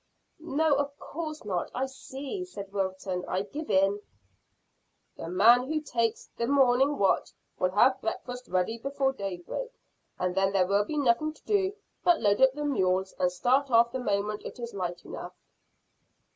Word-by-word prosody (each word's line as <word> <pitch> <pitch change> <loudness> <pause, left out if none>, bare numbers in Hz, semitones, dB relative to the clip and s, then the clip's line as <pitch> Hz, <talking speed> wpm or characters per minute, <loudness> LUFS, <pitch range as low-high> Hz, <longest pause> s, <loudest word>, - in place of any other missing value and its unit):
"No, 315 -1 +1
of 285 0 -2
course 310 -4 -6
not. 185 -4 -2
I 260 - 0
see," 270 +6 -6
said 200 - -9
Wilton. 190 -2 -2
"I 185 +1 -1
give 295 +9 -7
in." 195 +1 +3 1.1
"The 165 - -7
man 235 +8 +5
who 310 +1 0
takes 235 -6 -1
the 235 - -1
morning 270 +1 +4
watch 195 -1 +2 0.3
will 185 - +2
have 255 +7 +3
breakfast 245 +2 -5
ready 185 +5 0
before 275 +1 0
daybreak, 195 - -5 0.5
and 180 0 -1
then 195 +1 +1
there 190 -2 +4
will 200 +2 +2
be 300 - -4
nothing 285 +3 +2
to - - -23
do 405 -2 +1 0.3
but 350 -2 +4
load 205 0 +2
up 265 0 +6
the 295 +1 -4
mules 190 -8 +1
and 180 -1 +2
start 260 +9 +2
off 235 -1 +5
the 260 - -3
moment 210 -2 -1
it - - -8
is 235 -1 -6
light 175 -3 -4
enough." - - -8
235 Hz, 170 wpm, -28 LUFS, 195-280 Hz, 1.1 s, up